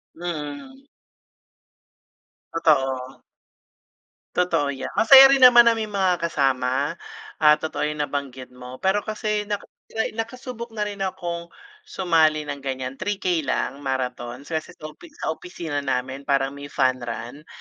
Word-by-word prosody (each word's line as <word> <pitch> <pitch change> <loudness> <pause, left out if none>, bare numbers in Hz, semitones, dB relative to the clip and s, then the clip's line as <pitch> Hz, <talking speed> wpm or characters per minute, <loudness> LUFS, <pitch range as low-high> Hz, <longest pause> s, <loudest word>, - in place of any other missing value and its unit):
Mm. 175 - -7 1.7
Totoo. 135 -5 0 1.1
Totoo 170 -5 +1
'yan. 140 -1 -4
Masaya 270 +3 +9
rin 275 - +4
naman 245 -2 +9
na 235 - +5
may 225 -1 -2
mga 190 -4 +1
kasama 135 -1 0 0.5
at 150 -1 +6
totoo 150 -1 -2
yung 150 0 -2
nabanggit 135 -3 -5
mo. 125 0 -10
Pero 190 +2 +3
kasi 210 -1 -3
naka 205 -1 -3 0.5
nakasubok 235 0 -6
na 210 - -1
rin 205 -1 -5
akong 175 -3 -4 0.4
sumali 160 - +2
ng 145 -1 -6
ganyan, 130 -1 -5
3K 185 -3 -1
lang, 135 +2 -1
marathon. 125 -2 -4
Kasi 160 0 -5
sa 155 0 -9
opisi 335 - -17
sa - - -2
opisina 160 -2 -5
namin 135 0 -3
parang 135 -1 +1
may 140 0 -9
fun 130 -2 +1
run. 120 +5 -7
155 Hz, 135 wpm, -23 LUFS, 135-205 Hz, 1.7 s, Masaya